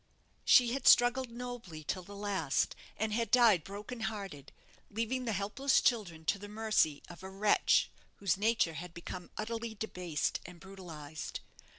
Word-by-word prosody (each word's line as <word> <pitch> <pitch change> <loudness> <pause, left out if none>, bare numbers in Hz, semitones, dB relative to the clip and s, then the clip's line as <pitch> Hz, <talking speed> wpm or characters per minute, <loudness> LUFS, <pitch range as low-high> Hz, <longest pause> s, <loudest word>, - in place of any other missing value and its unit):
She 245 -1 +6
had 270 -1 -1
struggled 245 +1 +6
nobly 235 -9 -7
till 185 - -3
the 200 +3 -11
last, 200 -8 0 0.2
and 215 0 -1
had 230 +1 0
died 225 -9 +5
broken 210 +6 -7
hearted, 195 -10 -5 0.4
leaving 230 +4 -2
the 230 - 0
helpless 210 +8 +2
children 175 -10 0
to 200 - +1
the 205 +1 -9
mercy 215 -9 +1
of 175 0 -11
a 190 - -7
wretch 200 +2 +3 0.2
whose 195 -3 +1
nature 210 -4 +2
had 170 +2 -8
become 175 +1 -7
utterly 225 +1 -4
debased 180 -7 -2
and 175 0 -11
brutalized. 165 -6 -8
205 Hz, 155 wpm, -33 LUFS, 175-230 Hz, 0.4 s, She